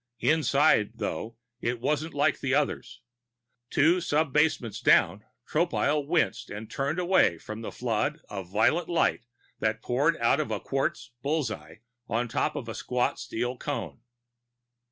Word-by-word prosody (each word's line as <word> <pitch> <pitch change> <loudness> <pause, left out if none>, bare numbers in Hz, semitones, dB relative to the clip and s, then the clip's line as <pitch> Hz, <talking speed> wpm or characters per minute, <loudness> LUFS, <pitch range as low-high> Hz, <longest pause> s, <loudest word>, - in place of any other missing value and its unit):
Inside, 145 -8 +3
though, 115 0 -4 0.2
it 120 0 -1
wasn't 150 +5 -1
like 145 0 +2
the 135 0 0
others. 145 -1 -2 0.7
Two 170 +5 +3
sub 155 -3 0
basements 150 -8 +1
down, 100 +5 +4 0.2
Tropile 150 -3 +1
winced 155 - 0
and 105 +2 -7
turned 140 +4 -1
away 180 - +3
from 110 +6 -8
the 115 - -5
flood 125 +6 -1
of 95 -3 -7
violet 110 - +2
light 165 -7 +1 0.3
that 110 0 -1
poured 145 +7 +2
out 115 +4 +3
of 155 - -1
a - - -2
quartz 135 -2 -2
bull's 145 -3 0
eye 80 +2 -9 0.3
on 120 +2 0
top - - -1
of - - -5
a - - -4
squat 125 -1 -1
steel 120 +2 -3
cone. 145 -5 -4
135 Hz, 150 wpm, -28 LUFS, 110-155 Hz, 0.7 s, down